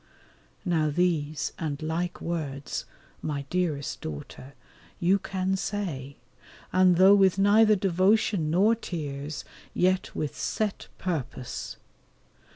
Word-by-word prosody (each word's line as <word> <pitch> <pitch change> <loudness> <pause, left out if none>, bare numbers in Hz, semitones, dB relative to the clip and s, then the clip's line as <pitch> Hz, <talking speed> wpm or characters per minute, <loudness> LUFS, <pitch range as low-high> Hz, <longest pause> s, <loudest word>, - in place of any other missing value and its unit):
Now 160 -4 +2
these 155 -2 0
and 150 -4 -3
like 165 +3 -3
words, 145 -5 -3 0.4
my 145 -2 -3
dearest 160 -7 -1
daughter, 80 - -8 0.4
you 185 +3 +3
can 190 0 -1
say, 165 -10 -4 0.6
and 185 -1 +5
though 190 +3 +7
with 195 -2 +5
neither 215 +2 +5
devotion 190 -2 +2
nor 195 +8 +4
tears, 150 -8 -5 0.3
yet 185 +1 +1
with 150 - -3
set 215 -2 -2
purpose. 135 -8 -4
175 Hz, 105 wpm, -27 LUFS, 145-190 Hz, 0.6 s, though